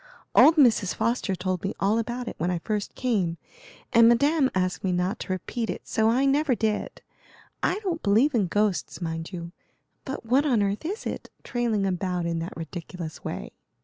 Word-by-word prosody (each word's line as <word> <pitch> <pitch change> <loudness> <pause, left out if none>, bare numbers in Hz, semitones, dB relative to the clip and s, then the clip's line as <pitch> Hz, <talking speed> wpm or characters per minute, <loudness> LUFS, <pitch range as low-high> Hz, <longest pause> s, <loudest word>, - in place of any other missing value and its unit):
Old 320 - +7
Mrs. 235 - +4
Foster 225 -3 0
told 185 -1 -2
me 195 - -2
all 210 +3 +2
about 240 +2 -3
it - - -3
when 170 +3 0
I 180 - 0
first 205 +4 -3
came, 195 -10 0 0.6
and 230 -1 +7
Madame 280 +4 +3
asked 185 -1 0
me 190 - +1
not 180 +2 -1
to - - -5
repeat 225 +5 -3
it, - - -5
so 220 0 +2
I 255 +4 +3
never 275 -1 +3
did. 220 -2 -2 0.6
I - - +1
don't 345 -4 -2
believe 230 +9 +3
in 210 -6 +2
ghosts, 205 +1 0
mind 165 -1 -4
you, 170 -2 -6 0.5
but 265 -3 -6
what 255 +5 +3
on 245 -8 +2
earth 200 +8 -2
is 410 +5 -4
it, - - -5
trailing 235 -5 0
about 180 -2 -1
in 170 -1 -1
that 165 +2 -6
ridiculous 165 0 -7
way?" - - -5
210 Hz, 185 wpm, -26 LUFS, 180-245 Hz, 0.6 s, Old